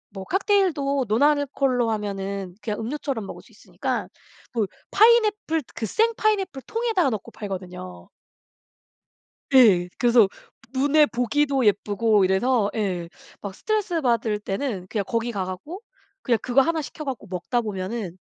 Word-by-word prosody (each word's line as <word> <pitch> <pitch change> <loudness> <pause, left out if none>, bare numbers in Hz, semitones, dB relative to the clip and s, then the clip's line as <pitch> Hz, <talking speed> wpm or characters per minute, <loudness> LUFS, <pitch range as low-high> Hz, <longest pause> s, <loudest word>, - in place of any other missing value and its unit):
뭐 190 -1 -6
칵테일도 335 - +1
논 220 +7 +2
알코올로 275 -5 +2
하면은 200 -3 -3
그냥 210 0 -3
음료처럼 255 -3 -3
먹을 - - -9
수 - - -22
있으니까 - - -4 0.5
뭐 220 -4 0 0.2
파인애플 425 - +4
그 220 - -3
생 455 - +2
파인애플 390 -11 0
통에다 450 - +1
넣고 215 -4 -5
팔거든요. 180 - -7 1.4
예. 195 -9 +6
그래서 240 -5 +5 0.4
눈에 290 +3 +4
보기도 270 +1 0
예쁘고 205 0 +2
이래서 205 +3 +2
예 180 -5 -2 0.3
막 200 -2 -6
스트레스받을 270 - 0
때는 195 -2 -3
그냥 210 -3 -1
거기 230 0 -1
가 195 -3 -2
갖고 295 - -7 0.4
그냥 235 -3 +2
그거 255 +2 +3
하나 325 +2 0
시켜 305 +1 -8
갖고 270 -3 -5
먹다 185 +7 -1
보면은 195 -2 -4
235 Hz, 305 characters per minute, -24 LUFS, 200-295 Hz, 1.4 s, 예